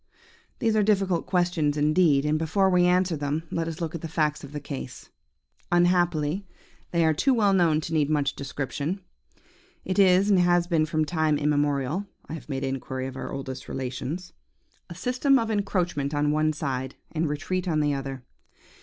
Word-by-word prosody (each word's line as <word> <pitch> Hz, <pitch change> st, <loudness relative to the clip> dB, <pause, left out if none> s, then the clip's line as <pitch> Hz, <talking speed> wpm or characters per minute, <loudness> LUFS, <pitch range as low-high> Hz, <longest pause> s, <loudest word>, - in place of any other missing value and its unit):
"These 225 Hz, -2 st, +1 dB
are 215 Hz, -, +4 dB
difficult 195 Hz, -4 st, +1 dB
questions 175 Hz, -5 st, +1 dB
indeed, 150 Hz, -1 st, +3 dB
and 155 Hz, +1 st, +1 dB
before 190 Hz, +4 st, +2 dB
we 180 Hz, -1 st, +4 dB
answer 180 Hz, -1 st, +2 dB
them, 145 Hz, +2 st, -2 dB
let 165 Hz, -1 st, -1 dB
us 165 Hz, 0 st, -5 dB
look 165 Hz, -1 st, -3 dB
at 170 Hz, -, -5 dB
the 165 Hz, -, -4 dB
facts 155 Hz, -2 st, -1 dB
of 140 Hz, -, -9 dB
the 150 Hz, -, -4 dB
case. 135 Hz, -3 st, -8 dB, 0.6 s
Unhappily 175 Hz, 0 st, +2 dB, 0.4 s
they 170 Hz, -1 st, +2 dB
are 160 Hz, -, +4 dB
too 260 Hz, -, +2 dB
well 205 Hz, -4 st, +3 dB
known 170 Hz, -5 st, +3 dB
to 160 Hz, -, -5 dB
need 150 Hz, -2 st, +2 dB
much 145 Hz, -2 st, +1 dB
description. 140 Hz, +6 st, -4 dB, 0.8 s
It 190 Hz, +2 st, -1 dB
is, 190 Hz, 0 st, +5 dB
and 190 Hz, -, +5 dB
has 175 Hz, -1 st, +3 dB
been 165 Hz, -3 st, +1 dB
from 155 Hz, 0 st, 0 dB
time 155 Hz, -1 st, +1 dB
immemorial 145 Hz, +4 st, 0 dB, 0.2 s
(I -, -, -7 dB
have 150 Hz, -5 st, -8 dB
made 135 Hz, -1 st, -3 dB
inquiry 130 Hz, 0 st, -3 dB
of 130 Hz, -1 st, -6 dB
our -, -, -5 dB
oldest 135 Hz, -1 st, -6 dB
relations), 130 Hz, +7 st, -5 dB, 0.6 s
a 170 Hz, -, -8 dB
system 255 Hz, -, +2 dB
of 225 Hz, -3 st, -1 dB
encroachment 180 Hz, -8 st, -1 dB
on 145 Hz, 0 st, +2 dB
one 155 Hz, +1 st, +2 dB
side, 135 Hz, -4 st, -3 dB, 0.2 s
and 160 Hz, -1 st, -1 dB
retreat 180 Hz, +5 st, -2 dB
on 155 Hz, -3 st, +1 dB
the 145 Hz, -1 st, +1 dB
other. 135 Hz, -2 st, -5 dB
155 Hz, 180 wpm, -26 LUFS, 145-180 Hz, 0.8 s, is